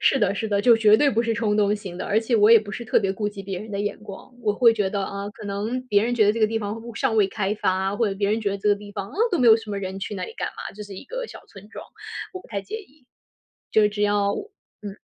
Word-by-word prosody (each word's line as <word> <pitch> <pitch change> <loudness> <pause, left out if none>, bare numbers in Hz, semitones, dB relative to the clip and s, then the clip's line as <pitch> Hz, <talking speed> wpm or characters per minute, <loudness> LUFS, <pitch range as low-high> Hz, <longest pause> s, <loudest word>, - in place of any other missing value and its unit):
是 270 - +3
的， 200 -3 +2
是 220 +2 -3
的， 200 -1 +1
就 235 +1 +6
绝 215 -1 +6
对 285 +3 +3
不 230 - +1
是 230 -1 0
冲 215 -2 0
动 205 0 +3
型 195 -4 -7
的， - - -4
而 210 - +2
且 230 +2 -1
我 210 +1 +5
也 230 - +9
不 205 -1 -8
是 235 - -5
特 220 - +3
别 195 -2 0
顾 205 +1 -2
及 200 -1 -8
别 190 -1 -5
人 220 - -9
的 200 -1 -3
眼 205 - -3
光。 210 +4 -11
我 210 - +2
会 230 +2 +5
觉 205 -3 0
得， 200 -1 -1
啊， 200 +1 -5
可 205 - -10
能 210 +5 -2
别 205 -3 +3
人 245 - 0
觉 220 -3 +4
得 205 - +4
这 230 - -4
个 215 - +5
地 225 +1 -1
方 210 -1 -4
会 225 - -8
不 235 0 -9
尚 235 +1 0
未 210 -2 +5
开 205 0 -1
发， 190 0 0
或 230 -1 +1
者 195 - -3
别 200 +1 0
人 220 - +1
觉 205 -2 -1
得 200 - -3
这 210 - 0
个 205 - +5
地 205 0 -11
方， 200 -1 -5
啊， - - -13 0.2
都 355 - +1
没 250 - +3
有 225 -1 +8
什 225 -2 -9
么 200 - -2
人， 190 0 -5
去 200 - -5
那 190 - -3
里 - - -9
干 - - -3
嘛？ - - -8
就 210 - -8
是 205 -1 -9
一 190 - -9
个 - - -5
小 - - -11
村 200 +1 -14
庄， - - -9 0.5
我 370 - -7
不 - - -18
太 200 -3 -3
介 435 - -6
意。 300 - -15 0.6
就 215 -1 +4
只 210 0 -3
要 205 -1 +2
我 405 - -6 0.3
嗯。 205 -1 -7
210 Hz, 350 characters per minute, -24 LUFS, 200-225 Hz, 0.6 s, 也